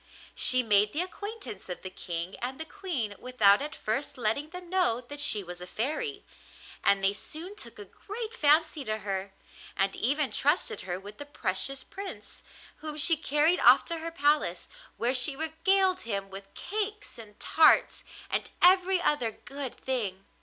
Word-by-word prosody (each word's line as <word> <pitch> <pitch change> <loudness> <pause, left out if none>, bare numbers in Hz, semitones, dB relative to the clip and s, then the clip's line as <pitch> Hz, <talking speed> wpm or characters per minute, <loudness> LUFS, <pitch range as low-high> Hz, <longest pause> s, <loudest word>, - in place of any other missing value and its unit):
She 255 0 +5
made 210 -1 +3
the 315 - 0
acquaintance 405 - -8
of 180 - -6
the 185 - -6
King 175 +1 -5
and 255 +2 -5
the 320 - -4
Queen 320 - -4
without 220 -5 +4
at 290 -1 -5
first 275 +6 -3
letting 245 +6 -1
them 360 +1 -9
know 355 -10 +2
that 285 +4 -9
she 210 -7 +4
was 175 0 -9
a 180 - -8
fairy, 400 - -3 0.6
and 195 -1 +3
they 195 +1 +3
soon 330 - -7
took 420 - -8
a 420 - -9
great 435 +3 -8
fancy 310 -4 +3
to 215 0 -2
her, 195 -2 -4 0.5
and 195 0 +1
even 280 +3 0
trusted 345 - +1
her 175 +1 -2
with 205 +2 -11
the 290 - -6
precious 270 +1 -3
Prince, 395 0 -9 0.4
whom 305 -1 -7
she 325 +2 +5
carried 310 +3 +2
off - - +6
to 335 -1 -4
her 330 +1 -5
palace, 295 -2 0 0.3
where 240 +2 +1
she 265 +2 +5
regaled 365 +5 +1
him 200 -3 -4
with 195 0 -9
cakes 415 - -5
and 210 -2 -13
tarts 315 -1 +4 0.3
and - - -1
every 370 +1 +5
other 295 -9 +1
good 275 +3 -8
thing. 205 -8 -2
285 Hz, 170 wpm, -28 LUFS, 210-350 Hz, 0.6 s, off